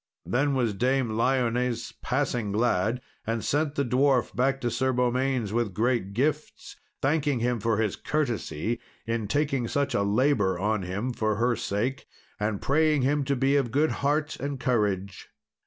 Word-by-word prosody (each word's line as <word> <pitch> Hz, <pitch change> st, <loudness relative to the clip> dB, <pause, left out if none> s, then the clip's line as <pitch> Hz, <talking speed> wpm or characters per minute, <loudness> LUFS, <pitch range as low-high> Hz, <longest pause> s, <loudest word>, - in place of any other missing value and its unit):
Then 140 Hz, +3 st, +1 dB
was 120 Hz, -5 st, +1 dB
Dame 130 Hz, +4 st, +1 dB
Lyones 120 Hz, 0 st, 0 dB
passing 125 Hz, -5 st, -1 dB
glad, 110 Hz, +2 st, +1 dB, 0.3 s
and 115 Hz, -1 st, -1 dB
sent 150 Hz, 0 st, 0 dB
the 140 Hz, -, +1 dB
dwarf 125 Hz, -3 st, +2 dB
back 135 Hz, +3 st, +1 dB
to 120 Hz, -2 st, -1 dB
Sir 130 Hz, +3 st, +1 dB
Beaumains 125 Hz, -2 st, 0 dB
with 115 Hz, -5 st, -1 dB
great 115 Hz, -3 st, 0 dB
gifts, 150 Hz, +6 st, -2 dB, 0.3 s
thanking 145 Hz, -2 st, +1 dB
him 120 Hz, 0 st, 0 dB
for 110 Hz, +1 st, +1 dB
his 105 Hz, -3 st, 0 dB
courtesy, 120 Hz, -, -2 dB, 0.3 s
in 115 Hz, -2 st, -2 dB
taking 140 Hz, -1 st, 0 dB
such 140 Hz, +2 st, 0 dB
a 120 Hz, -, +2 dB
labour 100 Hz, -2 st, +2 dB
on 105 Hz, +2 st, 0 dB
him 100 Hz, +8 st, -3 dB
for 110 Hz, -2 st, 0 dB
her 120 Hz, +2 st, +1 dB
sake, 110 Hz, +7 st, -2 dB, 0.3 s
and 105 Hz, -1 st, -2 dB
praying 150 Hz, -1 st, +3 dB
him 145 Hz, +2 st, +2 dB
to 140 Hz, +1 st, +1 dB
be 135 Hz, +2 st, +2 dB
of 135 Hz, -4 st, +2 dB
good 150 Hz, +6 st, +2 dB
heart 150 Hz, +2 st, 0 dB
and 140 Hz, -1 st, -3 dB
courage. 105 Hz, -6 st, -1 dB
125 Hz, 160 wpm, -27 LUFS, 110-135 Hz, 0.3 s, praying